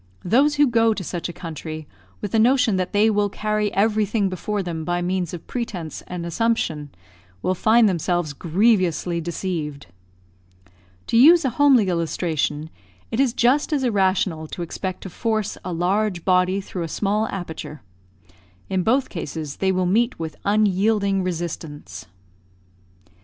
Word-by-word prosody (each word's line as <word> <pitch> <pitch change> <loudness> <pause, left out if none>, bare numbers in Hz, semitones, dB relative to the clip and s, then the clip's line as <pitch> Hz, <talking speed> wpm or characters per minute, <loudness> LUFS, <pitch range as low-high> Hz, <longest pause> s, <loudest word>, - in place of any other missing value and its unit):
Those 275 +10 +3
who 290 0 +5
go 230 -3 +3
to 195 - -5
such 175 0 -4
a - - -6
country 160 -3 -7 0.3
with 205 - -4
the 225 - +2
notion 240 -2 +4
that 185 -1 -2
they 205 +2 +4
will 205 -2 +2
carry 215 0 -1
everything 210 0 +1
before 200 +2 -3
them 165 -3 -4
by 175 +2 -1
means 180 -1 -1
of 175 - -8
pretence 185 - -5
and 180 -1 -5
assumption, 170 -7 -1 0.5
will 185 - +1
find 220 +4 +4
themselves 175 -3 0
grievously 180 0 +1
deceived. 160 - -4 1.2
To 230 - +1
use 320 +5 +7
a 260 - +1
homely 265 -5 +4
illustration, 160 -3 -1 0.4
it 225 - -2
is 270 -3 +3
just 260 +6 +2
as 285 -3 +1
irrational 190 -7 +1
to 175 - -5
expect 185 +2 -5
to 190 - -6
force 220 +1 -1
a 180 - -4
large 180 +1 0
body 185 +1 +2
through 185 -1 -6
a 165 - -2
small 210 +6 0
aperture. 160 -5 -7 0.9
In 190 -1 +1
both 255 +7 +2
cases 155 -4 -6
they 190 -1 +1
will 185 -1 0
meet 230 +7 +1
with 160 -1 -5
unyielding 200 -1 +2
resistance. 160 - -5
190 Hz, 150 wpm, -22 LUFS, 170-220 Hz, 1.2 s, use